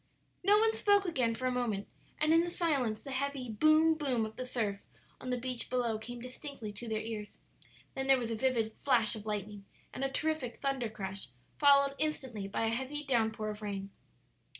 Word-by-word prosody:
No 405 +3 +6
one 445 +1 +4
spoke 405 -2 +3
again 255 -10 +1
for 255 - -4
a 255 - +2
moment, 230 -5 -1 0.3
and 310 +1 +3
in 330 - +6
the 345 - -2
silence 275 -11 0
the 275 - -7
heavy 265 -2 -2
boom, 310 +8 +5
boom 265 -8 0
of 220 0 -8
the 255 - -5
surf 210 -5 -1 0.4
on 255 - -6
the 250 - 0
beach 250 0 -3
below 235 -3 0
came 240 +2 -7
distinctly 250 -3 -7
to 230 +3 -7
their 215 -1 -1
ears. 220 -2 -6 0.6
Then 265 0 -3
there 270 -1 +6
was 235 -2 -3
a - - 0
vivid 225 -2 +1
flash 235 -6 +3
of 215 0 -8
lightning 205 -1 -4 0.3
and 270 - -4
a 270 - +1
terrific 300 -4 -1
thunder 270 -4 -1
crash, 195 -2 -6 0.3
followed 280 -1 +6
instantly 260 -10 -2
by 215 +3 -1
a - - +2
heavy 265 +6 -2
down 240 -6 +2
pour 215 -1 -3
of 210 0 -9
rain. 200 -1 -4
250 Hz, 200 wpm, -32 LUFS, 220-280 Hz, 0.6 s, No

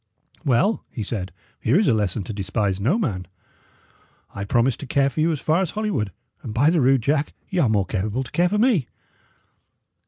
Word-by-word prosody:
"Well," 160 - +2
he 110 - -5
said, 95 -3 -4 0.3
"here 120 +9 +2
is 205 - +3
a 125 - +4
lesson 105 -1 0
to 110 - -6
despise 100 0 -1
no 130 - +2
man. 100 - -2 1.1
I 100 0 -4
promised 120 +3 +1
to 145 - -7
care 140 +1 +2
for 155 - -2
you 165 +2 +3
as 155 - -2
far 160 +6 +2
as 185 - -1
Holywood, 205 - -2 0.3
and, 110 - -7
by 145 +7 +4
the 170 -3 +2
rood, 130 -1 +3
Jack, 145 +2 0 0.2
y' 185 - 0
are 130 - +3
more 105 -3 +2
capable 105 +6 -2
to - - -12
care 175 +1 +2
for 210 - 0
me." 215 - +3
130 Hz, 205 wpm, -23 LUFS, 105-165 Hz, 1.1 s, a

